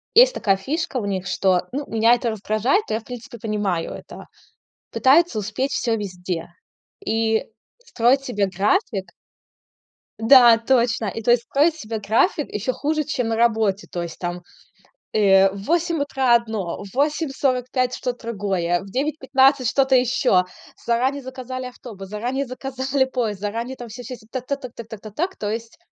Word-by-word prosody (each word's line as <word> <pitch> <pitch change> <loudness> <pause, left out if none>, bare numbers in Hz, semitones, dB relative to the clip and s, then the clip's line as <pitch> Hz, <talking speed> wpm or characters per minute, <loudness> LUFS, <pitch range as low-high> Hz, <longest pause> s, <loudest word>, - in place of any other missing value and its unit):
Есть - - +8
такая 195 -2 +2
фишка 290 - -3
у 220 - -2
них, 190 -2 -3
что 185 -1 +1
ну, 285 +2 -3
меня 225 +1 +4
это 240 -1 -2
раздражает, 220 - +1
но - - 0
я 225 - -3
в - - -25
принципе 245 0 -9
понимаю 205 -6 -2
это. - - -10 0.7
Пытаются 290 -2 +4
успеть 225 +7 -2
всё 230 -2 0
везде. 180 -4 -4 0.6
И 225 0 +1 0.4
строить 270 - +2
себе 205 -6 0
график 195 - 0 1.1
да, 235 0 +8
точно. 235 -1 +1
И 225 +4 -4
то 240 - +3
есть 240 -1 +3
строить 300 +6 +2
себе 225 -7 -5
график 230 - +1
ещё 230 +5 -2
хуже, 305 +1 -1
чем 260 -6 -2
на 225 - 0
работе. 220 -4 +1
То 175 - -3
есть 170 -1 -8
там, 175 0 -4 0.7
э, 195 -2 +5
в 195 0 -8
8 335 - +1
утра 265 -4 +2
одно, 220 -7 -1
в 195 - -12
8:45 270 -3 0
что-то 245 -2 -5
другое, 185 -4 0
в 195 - -11
9:15 270 -1 +2
что-то 265 -1 +2
ещё. 245 -7 +3 0.4
Заранее 260 +4 +1
заказали 255 0 -6
автобус, 220 -6 -10
заранее 250 +6 -2
заказали 265 +1 -1
поезд, 230 -7 -2
заранее 230 +5 -4
там 240 -1 -8
всё, 245 +3 -9
всё, 250 +2 -7
всё. 215 - -20
Так, 255 -1 -5
так, 280 0 -2
так, 255 -3 -8
так, 230 -1 -9
так, 220 -3 -9
так, 215 -1 -11
так. 360 - -2
То 205 - -3
есть. 230 +1 -6
235 Hz, 170 wpm, -22 LUFS, 210-265 Hz, 1.1 s, Есть